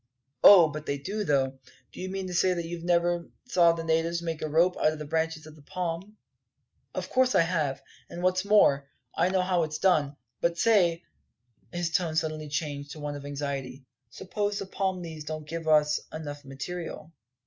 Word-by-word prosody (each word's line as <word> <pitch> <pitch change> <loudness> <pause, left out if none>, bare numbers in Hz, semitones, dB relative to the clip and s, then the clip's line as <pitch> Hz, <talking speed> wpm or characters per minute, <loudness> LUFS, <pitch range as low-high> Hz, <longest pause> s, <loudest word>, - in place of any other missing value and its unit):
"Oh, 180 -5 +10
but 155 0 -7
they 140 - -1
do, 200 +9 -3
though. 135 -5 +1 0.3
Do - - -9
you 185 - -4
mean 195 0 -4
to 180 - -5
say 180 +1 +3
that 170 -1 -3
you 170 0 -6
never 175 0 +1 0.2
saw 175 -9 +4
the 165 0 -4
natives 165 +1 +1
make 165 -2 -3
a 155 - -2
rope 170 +4 +3
out 155 - +3
of - - -7
the 150 - -6
branches 160 0 -2
of 155 -1 -12
a 155 - -17
palm?" 180 +5 -5 0.8
"Of - - -3
course 255 0 +3
I - - +6
have. 160 -5 -1 0.3
And 175 +1 -7
what's 185 0 +2
more, 140 -10 +4 0.2
I 180 - +2
know 185 -1 +1
how 180 -1 +1
it's 155 -1 -2
done. 155 -6 +2 0.2
But 170 0 0
say," 175 -6 +3 0.7
his 175 -1 -2
tone 170 -3 0
suddenly 155 -1 -2
changing 145 -1 -3
to 155 - -10
one 145 0 -4
of 145 0 -8
anxiety, 140 -2 -5 0.2
"suppose 205 - -3
the - - -4
palm 190 -1 -2
leaves 160 -2 -7
don't 155 -1 -6
give, 165 0 -5
us 150 -1 +4
enough 145 -2 -7
material?" 165 +3 -7
165 Hz, 195 wpm, -28 LUFS, 150-180 Hz, 0.8 s, Oh